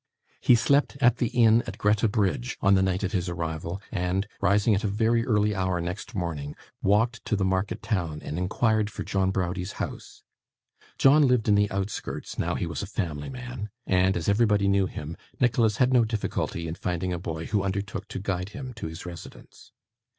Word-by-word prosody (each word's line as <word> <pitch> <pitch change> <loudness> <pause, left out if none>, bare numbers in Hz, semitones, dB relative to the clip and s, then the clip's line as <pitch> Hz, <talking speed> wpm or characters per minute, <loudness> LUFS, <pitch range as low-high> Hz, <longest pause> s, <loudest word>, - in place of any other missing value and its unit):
He 125 - +5
slept 140 +4 +2
at 125 -3 +4
the 120 - +1
inn 115 0 +4
at - - -6
Greta 105 +2 +2
Bridge 100 - -1
on 100 - +4
the 95 - +4
night 95 +1 0
of 95 - -1
his 95 -3 -1
arrival, 85 +1 -4
and, 95 0 -1
rising 100 +3 +3
at 100 +3 0
a - - +1
very 115 +3 +2
early 105 -2 +2
hour 95 -2 0
next 90 +7 -5
morning, 80 -6 -3 0.3
walked 115 +4 +2
to - - 0
the 95 -2 0
market 95 +4 -1
town, 85 -7 -1
and - - -5
inquired 110 +3 +1
for - - -6
John 95 -1 0
Browdie's 90 0 -2
house. - - -6 0.7
John 140 +1 +6
lived 125 -3 +2
in 105 - +5
the 100 0 +3
outskirts, 95 0 -4
now - - 0
he - - -1
was 80 -3 -4
a - - -5
family 80 -8 -3
man; 125 -4 -6 0.2
and 95 0 +2
as 85 - -4
everbody 105 -1 +3
knew 100 -1 +3
him, 80 -1 -7 0.2
Nicholas 115 -4 +2
had 130 0 +3
no 125 -2 +6
difficulty 105 -6 -2
in 80 - -3
finding 90 +1 -2
a 85 - -3
boy 80 -1 -5
who 105 -3 0
undertook 100 +1 -3
to - - -6
guide 95 -1 -2
him 130 +3 -7
to 115 - -4
his 80 +2 -8
residence. 85 -2 -11
100 Hz, 195 wpm, -26 LUFS, 90-110 Hz, 0.7 s, John